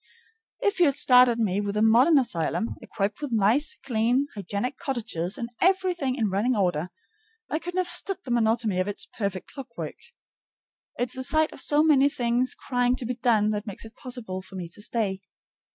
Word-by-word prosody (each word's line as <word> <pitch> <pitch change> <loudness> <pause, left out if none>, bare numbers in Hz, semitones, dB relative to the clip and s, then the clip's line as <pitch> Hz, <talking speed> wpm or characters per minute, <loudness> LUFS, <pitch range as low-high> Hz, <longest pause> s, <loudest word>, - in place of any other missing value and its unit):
If 405 -2 0
you 345 - +6
had 280 - +1
started 250 -2 +6
me 205 -3 0
with 205 0 -3
a 215 - +2
modern 245 +8 +5
asylum, 225 - -1
equipped 205 +5 -3
with 290 -3 -4
nice, 225 +7 +2
clean, 245 +3 +1
hygienic 205 +6 -4
cottages 215 - -3
and 235 -3 -4
everything 360 -8 +1
in 220 -7 -1
running 220 +6 +1
order, 180 -4 0 0.6
I 310 - 0
couldn't 355 +2 -6
have 365 -1 +1
stood 390 +2 +3
the 250 - -5
monotony 225 -4 +1
of 185 - 0
its 205 - -3
perfect 200 -5 -5
clockwork. 255 -4 -7 1.0
It's 245 +2 -1
the 260 - -4
sight 315 +3 +2
of - - -2
so 295 +1 +3
many 285 -3 +5
things 245 -1 0
crying 245 0 0
to 255 - -5
be 250 - -2
done 225 -4 +2
that 210 +1 -4
makes 205 +2 -6
it 220 - -13
possible 230 -7 -5
for 190 - -14
me 175 -2 -6
to 190 - -8
stay. 205 -4 -2
235 Hz, 185 wpm, -26 LUFS, 205-265 Hz, 1.0 s, you